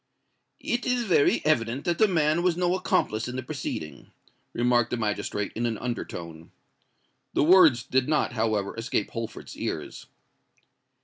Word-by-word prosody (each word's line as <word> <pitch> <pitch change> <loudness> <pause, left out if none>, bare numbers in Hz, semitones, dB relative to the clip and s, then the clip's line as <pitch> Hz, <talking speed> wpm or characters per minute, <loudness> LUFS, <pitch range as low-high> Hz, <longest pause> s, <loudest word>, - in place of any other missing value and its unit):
"It 240 +1 -1
is 250 -1 +1
very 175 -10 +2
evident 125 -3 +1
that 175 -1 0
the 215 - +6
man 160 -3 +2
was 175 -1 +1
no 180 0 +1
accomplice 110 -11 0
in 125 - -5
the 130 - -4
proceeding," 80 - -6 0.4
remarked 120 -1 +2
the 120 - -2
magistrate, 105 -2 -2
in 120 +1 0
an 115 -2 -2
under 120 +1 -3
tone. 85 -1 -9 0.9
The - - +3
words 160 -8 +6
did 130 +2 0
not, 150 -5 +1
however, 110 -3 -1
escape 115 -2 -2
Holford's 115 -1 -6
ears. - - -5
125 Hz, 150 wpm, -26 LUFS, 110-165 Hz, 0.9 s, the